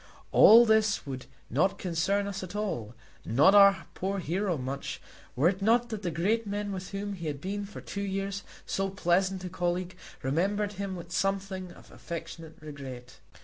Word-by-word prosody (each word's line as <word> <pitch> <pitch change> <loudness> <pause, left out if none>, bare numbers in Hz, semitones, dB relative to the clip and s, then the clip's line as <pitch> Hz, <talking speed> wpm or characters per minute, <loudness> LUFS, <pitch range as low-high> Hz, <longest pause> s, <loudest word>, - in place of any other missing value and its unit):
All 235 +2 +9
this 220 -3 +3
would 130 -3 -6 0.2
not 160 - +1
concern 190 +3 0
us 200 -1 -4
at 185 +1 -7
all, 120 - -3 0.3
nor 145 - +5
our 200 -1 +7
poor 195 +2 -2
hero 180 +1 -1
much, 135 +1 -4 0.4
were 140 +6 +4
it 190 +1 -4
not 235 +3 +3
that 220 -3 -4
the 180 - -1
great 205 +8 0
men 205 0 -3
with 185 -1 -5
whom 200 0 -4
he 170 -4 -6
had 145 -2 -3
been 200 +5 -4
for 210 - -9
two 200 - -5
years 195 0 -2 0.2
so 195 0 -1
pleasant 190 0 +1
a 180 - -4
colleague, 180 +1 -2 0.3
remembered 200 +9 0
him 195 -1 -4
with 170 -1 -9
something 190 0 -1
of - - -17
affectionate 165 -1 -8
regret. 130 -5 -9
190 Hz, 175 wpm, -29 LUFS, 170-200 Hz, 0.4 s, All